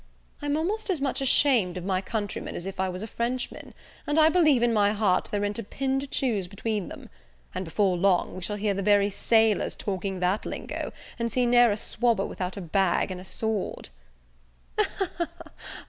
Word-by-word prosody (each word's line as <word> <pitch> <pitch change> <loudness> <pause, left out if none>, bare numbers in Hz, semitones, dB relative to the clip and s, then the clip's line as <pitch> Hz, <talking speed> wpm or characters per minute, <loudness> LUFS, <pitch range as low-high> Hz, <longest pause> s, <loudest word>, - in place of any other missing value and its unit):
I'm 290 0 0
almost 410 +7 -1
as 360 -5 +1
much 275 0 -1
ashamed 245 -9 +3
of 180 - -6
my 190 -1 0
countrymen 205 0 -4
as 175 - -5
if 195 -1 -6
I 190 0 +1
was 185 +2 -5
a - - -5
Frenchman, 240 +3 -4 0.3
and 295 - +1
I 315 0 +7
believe 310 -8 +4
in 240 -1 +3
my 205 -1 +3
heart 205 -3 +1
there 205 0 -1
i'n't 205 +2 -2
a - - -3
pin 265 +5 -1
to 280 - -5
choose 230 -9 0
between 205 +1 -3
them; - - -10 0.5
and, - - -3
before 185 +2 +1
long, 185 0 +2
we 185 - -7
shall 210 +3 -2
hear 205 0 0
the 195 - -2
very 205 0 +3
sailors 220 +1 +2
talking 190 -1 -3
that 180 +3 +1
lingo, - - -5 0.3
and 235 0 -1
see 250 +3 +2
never 240 -2 +5
a - - -4
swabber 225 -2 +1
without 185 +1 -4
a - - -4
bag 185 +2 +1
and 180 -1 -6
a - - -10
sword." 215 - -2
210 Hz, 195 wpm, -27 LUFS, 190-245 Hz, 0.5 s, I